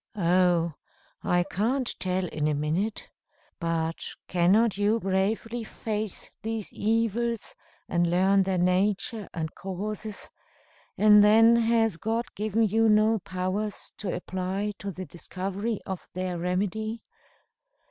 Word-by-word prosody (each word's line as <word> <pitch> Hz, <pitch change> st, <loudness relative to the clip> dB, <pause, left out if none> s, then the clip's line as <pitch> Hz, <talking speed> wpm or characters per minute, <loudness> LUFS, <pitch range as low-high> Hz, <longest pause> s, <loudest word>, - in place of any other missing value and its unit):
"Oh! 175 Hz, -2 st, +3 dB, 0.5 s
I 175 Hz, 0 st, +2 dB
can't 230 Hz, +9 st, 0 dB
tell 185 Hz, 0 st, 0 dB
in 150 Hz, -1 st, -1 dB
a 150 Hz, -, +1 dB
minute. 165 Hz, +9 st, -1 dB, 0.5 s
But 165 Hz, -1 st, -1 dB, 0.2 s
cannot 190 Hz, +5 st, +3 dB
you 205 Hz, +3 st, +2 dB
bravely 215 Hz, +4 st, -1 dB
face 215 Hz, -2 st, -5 dB
these 225 Hz, -2 st, -4 dB
evils, 230 Hz, +1 st, 0 dB, 0.3 s
and 175 Hz, -1 st, +1 dB
learn 190 Hz, +3 st, +4 dB
their 190 Hz, -1 st, 0 dB
nature 195 Hz, +4 st, +1 dB
and 160 Hz, -2 st, -4 dB
causes; 205 Hz, +3 st, -5 dB, 0.7 s
and 210 Hz, 0 st, +7 dB
then 225 Hz, +2 st, +7 dB
has 225 Hz, -4 st, +2 dB
God 225 Hz, +6 st, -1 dB
given 215 Hz, +2 st, +1 dB
you 220 Hz, +1 st, +3 dB
no 215 Hz, +1 st, +4 dB
powers 185 Hz, +3 st, -3 dB
to 200 Hz, -4 st, -3 dB
apply 185 Hz, +3 st, -3 dB
to 200 Hz, -, -4 dB
the 185 Hz, 0 st, -6 dB
discovery 195 Hz, +5 st, -4 dB
of 190 Hz, -2 st, -6 dB
their 185 Hz, -1 st, -2 dB
remedy? 205 Hz, +5 st, -2 dB
200 Hz, 120 wpm, -27 LUFS, 180-220 Hz, 0.7 s, and